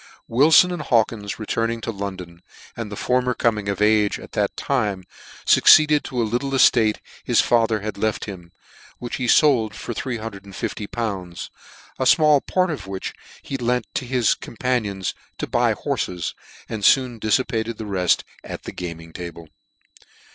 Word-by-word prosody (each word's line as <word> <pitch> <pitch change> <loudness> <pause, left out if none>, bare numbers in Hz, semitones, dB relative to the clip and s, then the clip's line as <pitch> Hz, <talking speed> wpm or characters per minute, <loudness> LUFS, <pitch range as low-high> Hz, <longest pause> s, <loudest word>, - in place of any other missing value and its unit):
Wilfon 155 +9 +5
and 175 - -4
Hawkins 110 -6 0
returning 115 +1 -2
to 115 - -3
London, 95 -4 -7 0.3
and 115 -3 -6
the - - -5
former 125 +2 0
coming 105 -3 0
of 100 +1 0
age 105 -1 +3
at - - -12
that - - -1
tine, 105 -9 -1 0.4
fucceeded 150 -1 +6
to 125 - -4
a - - +3
little 120 +5 -2
eftate 115 -5 +4 0.3
his - - +2
father 115 -3 +2
had 105 -1 -5
left 110 0 -1
him, 90 -4 -9 0.5
which 120 0 -5
he 125 - -2
fold 120 -6 +4
for 120 - -5
350!. 110 -4 -5
a - - -10 1.1
fmall 150 +2 +4
part 185 -2 +1
of 105 - -6
which 95 -1 -5 0.3
he 135 - -4
lent 125 -1 0
to 130 - -3
his 125 -2 +2
companions, 110 -6 -2 0.2
to - - -3
buy - - +1
horfes, 90 -2 -3 0.3
and 110 -2 -5
foon 125 0 +3
diffipated 115 0 0
tilt 110 - -6
reft 90 -3 +2 0.2
at - - -8
the - - -6
gaming 85 -2 -7
table. 85 -2 -8
110 Hz, 155 wpm, -22 LUFS, 100-125 Hz, 1.1 s, fucceeded